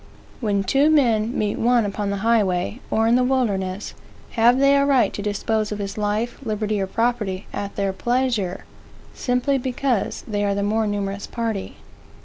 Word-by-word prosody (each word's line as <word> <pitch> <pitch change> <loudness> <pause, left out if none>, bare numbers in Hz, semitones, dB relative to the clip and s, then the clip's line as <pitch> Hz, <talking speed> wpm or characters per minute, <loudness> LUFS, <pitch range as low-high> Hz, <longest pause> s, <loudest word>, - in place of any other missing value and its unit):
When 205 -4 0
two 275 +10 +3
men 240 -6 +2
meet 210 -1 -1
one 240 -1 +3
upon 205 0 -2
the 200 - -1
highway, 210 -2 +1
or 220 - +2
in 230 - +4
the 250 - +3
wilderness, 205 -7 -1 0.4
have 235 +2 +4
they 275 +1 +5
a 280 - +4
right 275 -3 +3
to - - -4
dispose 210 +1 -1
of 210 - -3
his 200 -1 -4
life, 210 +3 -2
liberty, 215 -2 -1
or 190 - -1
property 210 -3 -1
at 200 0 -4
their 195 -1 -1
pleasure, 235 -5 -1 0.5
simply 250 +2 0
because 255 -3 -1
they 205 -2 -1
are 200 -1 +1
the 200 - -1
more 215 +1 +1
numerous 200 -1 -3
party? 225 -4 -3
215 Hz, 170 wpm, -22 LUFS, 200-245 Hz, 0.5 s, they